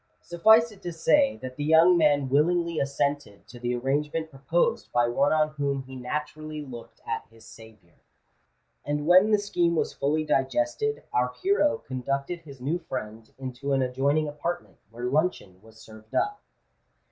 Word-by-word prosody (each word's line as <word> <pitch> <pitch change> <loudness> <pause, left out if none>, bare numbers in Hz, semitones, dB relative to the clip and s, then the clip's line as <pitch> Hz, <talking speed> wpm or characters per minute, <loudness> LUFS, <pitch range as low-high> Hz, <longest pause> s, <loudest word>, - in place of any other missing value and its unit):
Suffice 220 +7 +4
it 205 - -16
to 175 - -5
say 270 - +3
that 130 0 -7
the 145 - -3
young 160 +4 +6
man 145 -4 +3
willingly 170 +4 +1
assented 140 -5 -2
to 120 - -12
the 120 0 -1
arrangement 150 +5 -1
proposed 140 +6 -1
by 120 0 +2
one 135 +4 +2
on 155 -1 +3
whom 140 -2 -2
he 130 0 -11
naturally 150 +4 -5
looked 120 -4 -11
at 115 0 -4
his 115 -1 -18
saviour; 110 -7 -16 0.9
and 145 0 -2
when 185 +5 +6
the 210 - +5
scheme 175 -4 0
was - - -1
fully 150 +3 0
digested, 135 +1 0
our 125 0 +1
hero 380 -6 +3
conducted 140 +6 -3
his 140 -5 -13
new 150 +8 -1
friend 115 -8 -7
into 130 +1 -4
an 135 -1 +2
adjoining 140 +4 +1
apartment, 170 +4 -5
where 120 +2 -7
luncheon 125 - -1
was 110 0 -18
served 110 0 -13
up. 415 0 0
145 Hz, 160 wpm, -26 LUFS, 125-165 Hz, 0.9 s, young